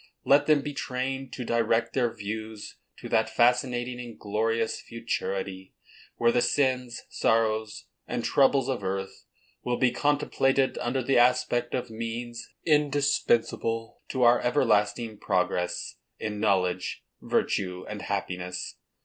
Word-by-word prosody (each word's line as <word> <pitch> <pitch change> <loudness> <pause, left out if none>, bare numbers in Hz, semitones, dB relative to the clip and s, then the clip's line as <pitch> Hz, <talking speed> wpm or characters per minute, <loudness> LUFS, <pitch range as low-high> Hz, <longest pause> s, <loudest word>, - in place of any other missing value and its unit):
Let 140 +1 +5
them 150 -2 +5
be 145 - -4
trained 135 0 -3
to 125 - -5
direct 115 0 +1
their 120 -3 +1
views 110 0 -6 0.2
to - - -8
that 110 0 +2
fascinating 125 +1 +2
and 120 -2 -8
glorious 110 +2 -1
futurity, 95 -4 -4 0.4
where 115 0 +3
the 120 - +2
sins, 130 -4 0
sorrows, 110 -1 0 0.2
and 120 - -3
troubles 135 -1 +3
of 130 -6 -2
earth, 95 0 -4 0.4
will 125 0 0
be 130 -2 +3
contemplated 135 -1 +1
under 125 +2 -1
the 135 0 +3
aspect 120 -1 +2
of 125 -2 -3
means 115 +1 -5 0.2
indispensable 140 -6 +1
to 130 -2 0
our 120 0 +6
everlasting 110 -4 +1
progress 90 -3 -1 0.2
in 105 -1 -4
knowledge, 95 -4 0 0.2
virtue 90 -1 -1
and - - -6
happiness. 90 0 -4
120 Hz, 125 wpm, -27 LUFS, 110-125 Hz, 0.4 s, our